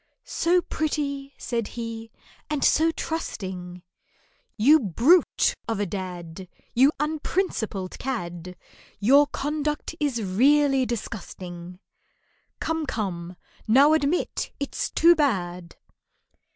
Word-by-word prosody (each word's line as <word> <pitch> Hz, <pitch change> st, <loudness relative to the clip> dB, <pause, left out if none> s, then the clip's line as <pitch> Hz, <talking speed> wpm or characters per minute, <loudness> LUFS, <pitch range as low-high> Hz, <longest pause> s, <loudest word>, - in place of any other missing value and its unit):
"So 350 Hz, +1 st, +1 dB
pretty," 280 Hz, -3 st, -3 dB
said 230 Hz, -3 st, -3 dB
he, 230 Hz, -1 st, -5 dB, 0.4 s
"and 300 Hz, -2 st, 0 dB
so 320 Hz, +1 st, +4 dB
trusting! 185 Hz, -, -5 dB, 0.7 s
You 285 Hz, +9 st, +6 dB
brute 255 Hz, -, +3 dB
of 225 Hz, -3 st, -2 dB
a 205 Hz, -, +1 dB
dad, 180 Hz, -2 st, -6 dB, 0.3 s
You 265 Hz, +4 st, +5 dB
unprincipled 300 Hz, -, -2 dB
cad, 180 Hz, -8 st, -5 dB, 0.4 s
Your 275 Hz, +8 st, +5 dB
conduct 300 Hz, +2 st, -3 dB
is 270 Hz, -7 st, -1 dB
really 270 Hz, +6 st, +3 dB
disgusting, 180 Hz, -6 st, -6 dB, 0.8 s
Come, 320 Hz, -2 st, -2 dB
come, 180 Hz, -7 st, -4 dB, 0.3 s
now 275 Hz, +7 st, +6 dB
admit 315 Hz, +2 st, 0 dB
it's 280 Hz, -, -3 dB
too 340 Hz, +1 st, +6 dB
bad! 180 Hz, -, -1 dB
240 Hz, 100 wpm, -25 LUFS, 185-295 Hz, 0.8 s, You